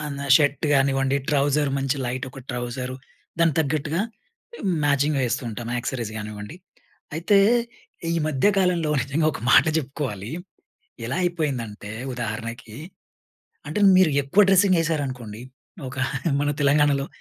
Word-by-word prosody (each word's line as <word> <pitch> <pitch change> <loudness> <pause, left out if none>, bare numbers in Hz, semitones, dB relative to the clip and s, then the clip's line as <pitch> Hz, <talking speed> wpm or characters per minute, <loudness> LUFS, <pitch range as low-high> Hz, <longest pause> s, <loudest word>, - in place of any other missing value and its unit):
ఆ! - - -5
నా 140 - -4
షర్ట్ 145 -1 +1
గానివ్వండి. 135 0 +2
ట్రౌజర్ 145 0 +2
మంచి 135 +1 -1
లైట్ 125 +2 -3
ఒక 135 - -12
ట్రౌజర్. 125 +1 -4 0.4
దానికి 165 -3 +3
తగ్గట్టుగా 155 +2 -1 0.8
మ్యాచింగ్ 145 +1 +2
ఏస్తూ 120 +3 -2
ఉంటాం, 115 +2 -6
యాక్సరీస్ 120 -3 -4
గానివ్వండి. 105 +6 -7 0.6
అయితే, 175 +6 +3 0.7
ఈ - - 0
మధ్య 150 +2 +1
కాలంలో 175 -4 +1
నిజంగా 140 +5 0
ఒక - - -7
మాట - - +7
జెప్పుకోవాలి. 130 -8 -4 0.8
ఎలా 130 - -2
అయిపోయిందంటే, 130 -12 -3 0.2
ఉదాహరణకి 115 -1 -5 0.9
అంటే, 155 +8 -2 0.2
మీరు 185 -4 +5
ఎక్కువ 160 +10 +4
డ్రెస్సింగ్ 190 -1 +5
ఏసారనుకోండి. 130 -9 -3 0.5
ఒక 130 - -10 0.4
మన 145 0 +1
తెలంగాణలో, 140 -1 +3
140 Hz, 120 wpm, -24 LUFS, 120-155 Hz, 0.9 s, మాట